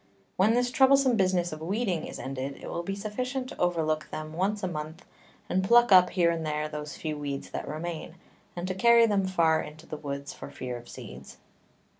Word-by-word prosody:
When 215 +5 +4
this 245 0 +1
troublesome 265 -1 +5
Business 185 -3 +1
of 155 0 -7
Weeding 190 -1 -1
is - - -7
ended, 135 +1 -5
it - - -9
will 170 - -3
be 195 +3 -4
sufficient 250 +6 -3
to - - -10
overlook 160 -3 0
them 155 0 -6
once 200 +4 -1
a - - +1
Month, 155 -1 -6 0.4
and 190 +1 +1
pluck 235 +3 +5
up 180 -1 +8
here 170 -2 +3
and 165 -1 -2
there 150 0 -1
those 150 0 -6
few 155 -1 -3
Weeds 140 -1 -5
that - - -5
remain, 160 +2 -5 0.4
and 175 +1 -4
to 185 - -1
carry 235 +4 +6
them 200 -3 +1
far 165 -4 +3
into 155 +2 -10
the 155 - -6
Woods 140 -1 -5
for - - -9
fear 125 -1 -5
of 120 0 -10
Seeds. 65 +2 -10
175 Hz, 205 wpm, -28 LUFS, 155-200 Hz, 0.4 s, up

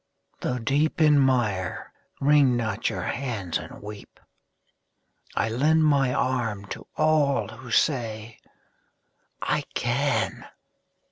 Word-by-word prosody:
Though 125 - -2
deep 140 +8 0
in 150 -2 +5
mire, 115 -9 0 0.3
wring 140 -3 +4
not 110 -1 -1
your - - -4
hands 115 -10 -3
and - - -11
weep; 105 0 -10 1.2
I - - +1
lend 155 +7 +3
my 140 -4 +3
arm 120 -6 -1
to - - -7
all 155 -4 +2
who 115 +3 -11
say 115 -4 0 1.0
"I - - +1
can!" 140 +4 0
125 Hz, 110 wpm, -25 LUFS, 110-140 Hz, 1.2 s, in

